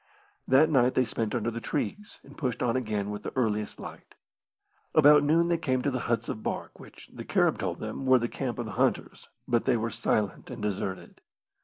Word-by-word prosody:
That 145 +5 +5
night 130 -3 +3
they 130 - +3
spent 110 -2 -2
under 115 +2 -1
the 115 +1 -5
trees, 205 - -4
and - - -15
pushed 125 -4 -2
on 120 -1 +1
again 105 -5 -2
with 105 - -5
the - - -5
earliest 105 -4 -1
light. - - -10 0.8
About 150 -1 +7
noon 165 +3 +3
they 170 -1 +1
came 130 -5 0
to 140 - +1
the 130 - -2
huts 115 -1 0
of 110 - -4
bark, - - -5
which, - - -14
the - - -7
Carib - - +1
told - - -2
them, 135 - -5
were 130 0 +7
the 120 -1 -1
camp 125 -1 -4
of 120 - -3
the 110 - -6
hunters, - - -1 0.2
but 120 -1 +1
they 130 -3 +3
were 115 +1 -2
silent 105 -1 -1
and 125 -2 -7
deserted. 100 -2 -4
120 Hz, 210 wpm, -28 LUFS, 110-135 Hz, 0.8 s, About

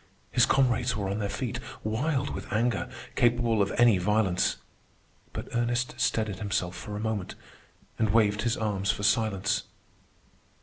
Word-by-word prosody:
His - - +4
comrades 125 -2 +2
were 100 -2 -2
on 100 +2 -2
their 100 -2 -1
feet, 100 - -3 0.2
wild 135 +6 -1
with - - -7
anger, 115 0 0 0.3
capable 120 -2 +3
of 100 - +1
any 120 -5 +5
violence. 100 -1 +1 0.7
But - - -6
Ernest 120 +1 0
steadied 110 -4 0
himself 95 -3 -1
for 105 +4 -7
a - - -4
moment, 110 -3 -3 0.6
and 110 -1 +2
waved 105 -1 +3
his 120 0 0
arms 100 -3 -1
for 105 0 0
silence. 105 -1 +2
110 Hz, 145 wpm, -28 LUFS, 100-120 Hz, 0.7 s, any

